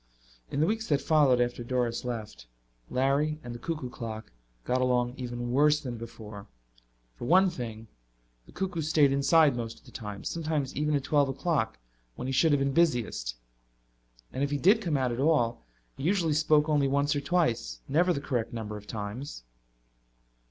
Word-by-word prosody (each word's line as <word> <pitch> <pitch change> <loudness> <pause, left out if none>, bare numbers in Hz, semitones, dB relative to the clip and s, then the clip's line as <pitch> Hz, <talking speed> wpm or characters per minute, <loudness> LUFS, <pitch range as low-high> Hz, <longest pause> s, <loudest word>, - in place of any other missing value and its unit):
In 140 - -3
the - - +5
weeks 220 +4 -1
that 145 -2 +2
followed 145 -6 +4
after 120 0 0
Doris 120 -1 -1
left, 110 - -6 0.4
Larry 140 +4 +1
and 120 - -6
the 120 - -8
cuckoo 150 -2 -4
clock 110 - -7 0.3
got 125 +1 0
along 125 -1 +1
even 120 -2 -4
worse 150 +3 +4
than 125 -5 -5
before. 110 -3 -9 0.7
For - - -8
one 185 +6 +5
thing, 115 -7 -7 0.6
the - - -15
cuckoo 185 -3 -3
stayed 150 -2 +3
inside 140 +1 +4
most 115 -1 -5
of - - -22
the - - -14
time, 105 -2 -7
sometimes 155 -5 -2
even 150 0 +1
at 140 - 0
twelve 145 -2 +2
o'clock 135 - -1 0.4
when - - -6
he - - -1
should 160 +5 +4
have 145 - +4
been 140 0 0
busiest. 120 - +1 1.0
And 135 - -1
if 140 - +1
he 145 - 0
did 200 +9 +4
come 165 -8 0
out 130 -2 0
at 120 - -3
all 120 - +1 0.3
he - - -9
usually 170 -2 +2
spoke 150 0 +3
only 145 -3 +2
once 140 +2 +1
or 145 - -1
twice, 130 - 0
never 175 +6 +3
the 160 - 0
correct 125 -5 -2
number 110 -2 -5
of 105 0 -12
times. 110 - -6
135 Hz, 180 wpm, -29 LUFS, 120-155 Hz, 1.0 s, the